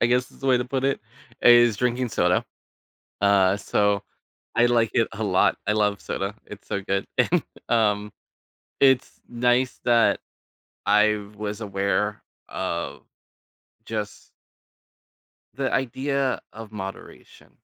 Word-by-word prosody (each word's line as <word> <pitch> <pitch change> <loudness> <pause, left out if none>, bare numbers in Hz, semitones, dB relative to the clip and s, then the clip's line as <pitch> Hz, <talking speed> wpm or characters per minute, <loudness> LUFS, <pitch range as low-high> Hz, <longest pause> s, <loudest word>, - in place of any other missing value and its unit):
I - - +4
guess 125 +1 +1
is - - -20
the 135 - -4
way 130 - +5
to 125 - -1
put 130 +1 -2
it, 135 0 +1 0.4
is 120 -2 +6
drinking 125 +2 0
soda. 90 -4 +2 0.8
Uh, 100 -1 +4
so 100 0 +1 0.5
I 120 +1 +4
like 115 -2 +2
it 115 -2 +3
a 110 - -5
lot. 95 -3 +3
I 105 - +2
love 105 -1 +1
soda. 100 +1 -4
It's 105 - -11
so 100 - -2
good. 95 0 -1
And, 165 +6 +3 0.3
um, 105 -3 +1 0.7
it's 135 -1 +3
nice 120 +1 +1
that 120 -1 +4 0.7
I 105 +1 +4 0.2
was 105 +1 -5
aware 100 +1 -1 0.3
of 90 -2 -4 0.8
just 105 -2 -5 1.2
the 135 +1 -2
idea 135 +1 0
of 110 -1 -10
moderation. 95 -2 -9
110 Hz, 130 wpm, -24 LUFS, 100-125 Hz, 1.2 s, is